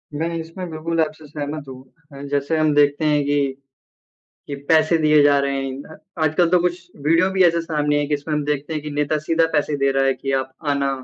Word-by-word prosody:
मैं 165 +3 -1
इसमें 165 +2 -7
बिल्कुल 165 +1 -2
आपसे 155 0 -3
सहमत 145 0 -6
हूँ 130 0 -10 0.3
अ, 140 - -9
जैसे 145 +3 0
हम 155 -1 +2
देखते 145 +1 +3
हैं 150 -1 +3
ये 145 -1 +1 1.0
कि 140 - -4
पैसे 160 +1 +4
दिए 155 -1 +4
जा 145 -1 +5
रहे 140 0 -1
हैं। 135 +4 -8 0.3
आजकल 160 +2 +2
तो 180 0 +4
कुछ 180 0 -1 0.3
वीडियो 165 +4 +3
भी 190 -1 +3
ऐसे 170 -1 +3
सामने 150 -2 0
है 145 - -1
जिसमें 150 +1 -2
हम 150 -1 0
देखते 150 +2 -2
हैं 155 - -3
कि 150 - -5
नेता 150 +1 0
सीधा 165 0 +3
पैसे 150 0 +1
दे 140 0 +2
रहा 135 0 +1
है 135 - +3
कि 135 +1 -5
आप 130 0 -6 0.2
आना। 140 -1 +1
150 Hz, 215 wpm, -21 LUFS, 145-160 Hz, 1.0 s, जा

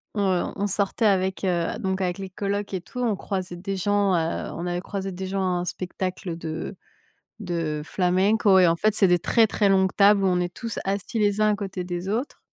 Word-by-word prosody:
heu, 190 -3 +1
on 205 +1 -1
sortait 200 +3 0
avec, 190 -1 +1
heu, 175 +1 0
donc 190 -3 -1
avec 180 +1 -1
les 190 -1 -5
colocs 200 +1 -3
et 185 - -1
tout, 250 - -9
on 225 -4 +1
croisait 185 -3 -4
des 195 +2 -4
gens, 200 0 +1
heu, 165 0 -1
on 170 - -5
avait 175 0 -1
croisé 195 -1 -4
des 190 +1 -5
gens 195 0 -2
à 180 -1 0
un 180 - -4
spectacle 185 -1 -4
de 160 -1 -5 0.7
de 165 -5 -2
flamenco 190 +4 +3
et 180 - +6
en 165 - +4
fait, 215 +5 +1
c'est 195 - +5
des 175 -1 +3
très, 230 -2 +4
très 205 -1 +1
longues 190 -1 +3
tables 200 0 +5
où - - +4
on 180 -1 +2
est 175 0 -2
tous 230 +4 -5
assis 200 +3 -2
les 205 0 +2
uns 215 0 +4
à - - +1
côté 190 -3 -4
des 175 +1 -4
autres 235 +7 -3
190 Hz, 225 wpm, -25 LUFS, 180-205 Hz, 0.7 s, et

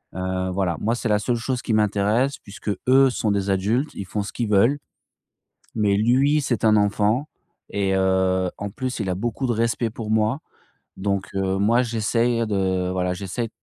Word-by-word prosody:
heu, 95 0 -2
voilà. 90 -2 -1
Moi, 115 +3 +1
c'est 120 - -3
la 105 - +3
seule 120 +4 0
chose 125 +2 -2
qui 110 - -2
m'intéresse 105 +6 +1
puisque, 100 +1 -6 0.2
eux 135 +1 +6
sont 110 -4 -1
des 100 -1 -1
adultes, 105 +9 0
ils 100 - -5
font 105 +2 -3
ce 100 - -7
qu'ils 115 -3 -2
veulent 115 +8 +4 1.0
mais 105 -2 +2
lui, 135 +7 +3
c'est 125 -5 -2
un 110 -1 +5
enfant 105 +7 +1 0.4
et 95 -1 0
heu, 95 -1 +2
en 100 - -4
plus, 130 +2 -4
il 95 -3 -2
a 90 - 0
beaucoup 120 +5 -2
de - - +1
respect 115 +1 0
pour 110 -1 -6
moi 110 +5 +1 0.6
donc 100 -1 -2
heu, 95 0 0
moi, 115 +5 +3
j'essaye 115 0 0
de, 95 -3 0
voilà, 90 0 -1
j'essaye 100 +5 -4
105 Hz, 185 wpm, -23 LUFS, 95-120 Hz, 1.0 s, eux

